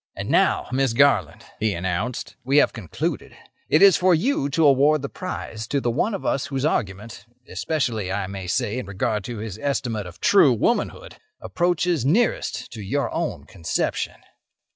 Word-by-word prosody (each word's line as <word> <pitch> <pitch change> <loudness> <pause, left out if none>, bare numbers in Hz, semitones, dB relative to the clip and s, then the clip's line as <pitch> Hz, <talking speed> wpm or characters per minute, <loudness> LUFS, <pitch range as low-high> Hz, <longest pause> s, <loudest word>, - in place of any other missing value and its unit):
"And - - -5
now, - - +2
Miss 130 -2 +1
Garland," 115 - +2
he 110 -2 0
announced, 95 +7 -3
"we 135 +3 +2
have 150 - +4
concluded. 100 -9 -4 0.3
It 155 - +5
is 195 -3 +7
for 185 -1 +4
you 165 - 0
to 160 +3 +2
award 145 +1 +4
the 140 - -3
prize 115 - -6
to 140 - 0
the 120 -3 -1
one 200 - 0
of - - -7
us 135 - 0
whose 135 0 -2
argument—especially, 115 - -3
I 100 0 -1
may 95 -1 -7
say, 105 +6 -1
in 125 - -7
regard 105 +2 -2
to 120 -2 -5
his 110 -1 -6
estimate 115 -7 -2
of 90 +2 -12
true 155 -10 +5
womanhood—approaches 175 +7 -1
nearest 205 - 0
to 110 - -8
your 100 - -2
own - - -3
conception." 85 0 -2
125 Hz, 165 wpm, -23 LUFS, 105-150 Hz, 0.3 s, is